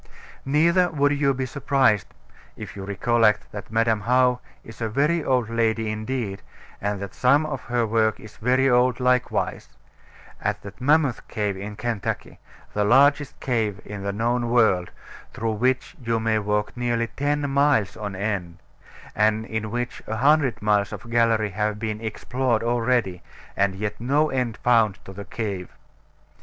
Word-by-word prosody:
Neither 170 +5 +3
would 145 -2 +2
you 145 -1 +2
be 130 0 -2
surprised 130 - +1 0.5
(if - - -8
you 100 - -6
recollect 105 +2 +1
that 105 -1 -8
Madam 115 -1 +2
How 125 +1 +3 0.2
is 115 +1 -12
a 115 - -1
very 150 +8 +1
old 125 -5 +1
lady 115 -1 0
indeed, 110 -2 -4 0.4
and 100 0 -2
that 100 -1 -6
some 140 +5 +3
of 140 -4 -4
her 120 -1 0
work 110 0 +1
is 110 - -13
very 130 +3 +2
old 125 -1 +3
likewise) 125 -1 0 0.7
at - - -2
that 100 +4 -11
Mammoth 145 -2 +2
Cave 105 -2 -2
in 100 +2 -7
Kentucky, 115 -2 -4 0.3
the 105 - +1
largest 140 +5 +3
cave 110 -6 -1
in 105 -1 -7
the 100 0 -2
known 120 +3 0
world, 110 -7 +3 0.5
through 115 0 -1
which 125 +4 0
you 115 -1 0
may 110 -1 +1
walk 105 0 -1
nearly 120 -1 0
ten 145 0 -1
miles 140 -7 +2
on 105 -2 -5
end, 95 -4 -3 0.6
and 110 +1 +2
in 110 -1 -3
which 120 +2 -4
a 110 - -2
hundred 140 -2 +3
miles 105 -1 +2
of 120 - -8
gallery 115 -3 +2
have 105 +1 -1
been 110 0 -4
explored 115 +2 -1
already, 115 -6 0 0.3
and 100 -1 +1
yet 105 +2 -4
no 145 +5 +2
end 125 -4 -1
found 115 -5 +3
to 95 - -9
the 100 +1 -8
cave. 100 -2 -4
115 Hz, 160 wpm, -24 LUFS, 105-130 Hz, 0.7 s, Neither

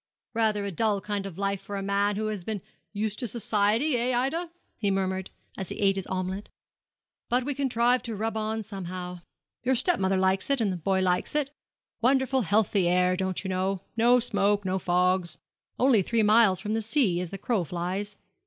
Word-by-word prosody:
'Rather 215 -3 +1
a 200 - -3
dull 205 +3 +1
kind 200 0 -3
of 180 -3 -10
life 200 -1 -1
for 200 +1 -7
a 195 - -3
man 200 +1 +1
who 215 +2 -2
has 210 -4 -3
been 215 +2 -3 0.3
used 210 0 -2
to 245 - -2
society 225 +5 +1
eh, 240 +1 0
Ida?' 325 +8 -1 0.3
he 205 -4 +1
murmured, 190 -1 -1 0.3
as 190 - -4
he - - -5
ate 195 -1 +3
his 195 -1 -4
omelette; 185 +2 -3 0.8
'but 250 +1 +3
we 285 - -1
contrive 250 -2 +2
to 230 -2 -5
rub 220 +2 -2
on 220 0 -2
somehow. 180 -3 -6 0.4
Your 260 +2 +1
step 355 +8 +3
mother 190 0 +1
likes 190 +3 +1
it, 275 -1 +2
and 205 -4 +1
the - - -4
boy 190 +3 0
likes 180 +7 0
it 290 -2 +1 0.5
wonderful 265 +1 +3
healthy 205 -2 +2
air, 180 +1 +3
don't 190 0 -2
you 190 - -4
know 185 0 -1
no 240 +2 +5
smoke 205 -3 +1
no 190 0 0
fogs 180 -2 +1 0.4
only 250 -5 +4
three 225 +4 +1
miles 210 -3 +5
from 210 +1 -3
the 225 - 0
sea, 220 - +2
as 180 - -4
the 195 - -6
crow 205 -1 0
flies. 185 +5 -4
205 Hz, 200 wpm, -27 LUFS, 190-230 Hz, 0.8 s, no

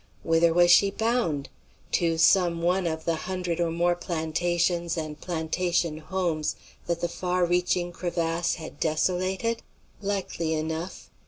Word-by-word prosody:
Whither 165 0 +4
was 175 +1 +5
she 200 +3 +6
bound? 220 - 0 0.4
To 165 -2 +1
some 170 0 +4
one 180 +1 +2
of 160 -1 -3
the 165 - +1
hundred 180 -2 -2
or 170 -1 +1
more 170 +1 +2
plantations 170 +1 -1
and 155 -2 -5
plantation 170 -1 -1
homes 165 -3 -1 0.3
that 170 0 -1
the 175 - +1
far 180 +1 0
reaching 175 0 +1
crevasse 170 -1 -1
had 160 -2 -9
desolated? 185 +7 0 0.4
Likely 190 -5 -2
enough. 160 +3 -4
175 Hz, 135 wpm, -26 LUFS, 165-180 Hz, 0.4 s, she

